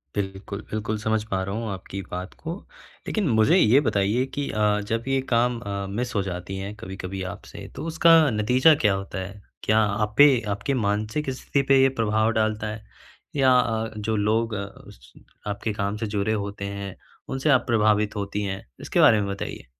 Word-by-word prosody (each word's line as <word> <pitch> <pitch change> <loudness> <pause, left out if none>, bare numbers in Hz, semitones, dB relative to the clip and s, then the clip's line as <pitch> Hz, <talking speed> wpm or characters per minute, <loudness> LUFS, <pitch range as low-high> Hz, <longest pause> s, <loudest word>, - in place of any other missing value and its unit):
बिल्कुल, 100 0 -4
बिल्कुल, 110 0 -2
समझ 110 0 0
पा 95 0 0
रहा 100 +2 -4
हूँ 115 -1 -3
आपकी 95 +1 -6
बात 90 +2 -5
को 165 +2 -4 0.5
लेकिन 210 -5 0
मुझे 110 -1 +4
ये 120 +6 +5
बताइए 105 +1 +1
कि 140 +1 -4
अ, 105 -1 +1
जब 115 +2 -2
ये 135 0 +1
काम 120 0 +2
अ, 100 -2 -4
मिस 120 +5 -3
हो 100 - +2
जाती 90 +1 -5
है 100 +2 -5
कभी-कभी 95 0 -6
आपसे - - -11
तो - - -5
उसका 165 +1 +4 0.2
नतीजा 125 +8 +4
क्या 105 -2 +4
होता 95 0 -4
है? 100 +2 -7 0.2
क्या 110 +1 +3
आप 105 0 0
पे 145 -4 +7
आपके 100 +7 -1
मानसिक 110 +5 -1
स्थिति 135 +2 -1
पे 135 -1 +6
ये 135 - +5
प्रभाव 110 +1 +2
डालता 110 0 0
है 110 0 -6 0.5
या 135 -2 +4
अ, 115 -2 -1
जो 110 +1 -1
लोग 110 +2 +1
अ, 100 -1 -3
उस 65 -10 -15 0.3
आपके 105 +1 -2
काम 100 +1 -2
से 110 - -3
जुड़े 105 +1 -1
होते 100 -1 -4
हैं, 100 -1 -6 0.3
उनसे 135 +3 -1
आप 130 -3 +4
प्रभावित 105 -2 +2
होती 100 0 -3
हैं? 95 0 -4 0.2
इसके - - -1
बारे 110 -2 +6
में 100 - -2
बताइए। 100 - -5
105 Hz, 190 wpm, -24 LUFS, 100-115 Hz, 0.5 s, पे